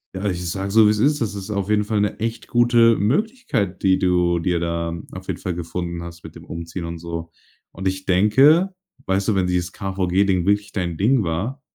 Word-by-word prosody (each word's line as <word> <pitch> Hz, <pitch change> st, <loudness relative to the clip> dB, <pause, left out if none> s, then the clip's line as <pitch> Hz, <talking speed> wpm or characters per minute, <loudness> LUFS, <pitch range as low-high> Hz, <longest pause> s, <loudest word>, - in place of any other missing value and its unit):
ja, 95 Hz, -, -4 dB
ich 90 Hz, -1 st, -3 dB
sage 95 Hz, +2 st, -3 dB
so, 110 Hz, 0 st, +6 dB
wie's 105 Hz, 0 st, +1 dB
ist, 145 Hz, +4 st, +2 dB
das 105 Hz, -2 st, -2 dB
ist 100 Hz, +1 st, -6 dB
auf 100 Hz, -1 st, -2 dB
jeden 105 Hz, -1 st, +3 dB
Fall 105 Hz, -1 st, 0 dB
'ne 105 Hz, -, -1 dB
echt 115 Hz, 0 st, -3 dB
gute 120 Hz, -1 st, +4 dB
Möglichkeit, 140 Hz, -, -1 dB
die 95 Hz, -1 st, +4 dB
du 90 Hz, -1 st, +2 dB
dir 85 Hz, 0 st, 0 dB
da 85 Hz, 0 st, -2 dB, 0.2 s
auf -, -, -9 dB
jeden -, -, -3 dB
Fall 90 Hz, -, -2 dB
gefunden 85 Hz, 0 st, -4 dB
hast 85 Hz, -1 st, -10 dB
mit -, -, -11 dB
dem -, -, -13 dB
Umziehen 85 Hz, +1 st, -6 dB
und 85 Hz, 0 st, -6 dB
so. 85 Hz, 0 st, -6 dB, 0.4 s
Und, 95 Hz, +2 st, -4 dB
ich 95 Hz, 0 st, -6 dB
denke, 135 Hz, -, +4 dB, 0.3 s
weißt 95 Hz, +1 st, 0 dB
du, 105 Hz, -, +2 dB
wenn 95 Hz, -1 st, +1 dB
dieses 90 Hz, -1 st, -1 dB
KVG 95 Hz, -1 st, 0 dB
Ding 90 Hz, -3 st, +1 dB
wirklich 100 Hz, +1 st, +1 dB
dein 85 Hz, -4 st, -2 dB
Ding 115 Hz, +3 st, +3 dB
war 105 Hz, -, -3 dB
95 Hz, 215 wpm, -21 LUFS, 85-105 Hz, 0.4 s, so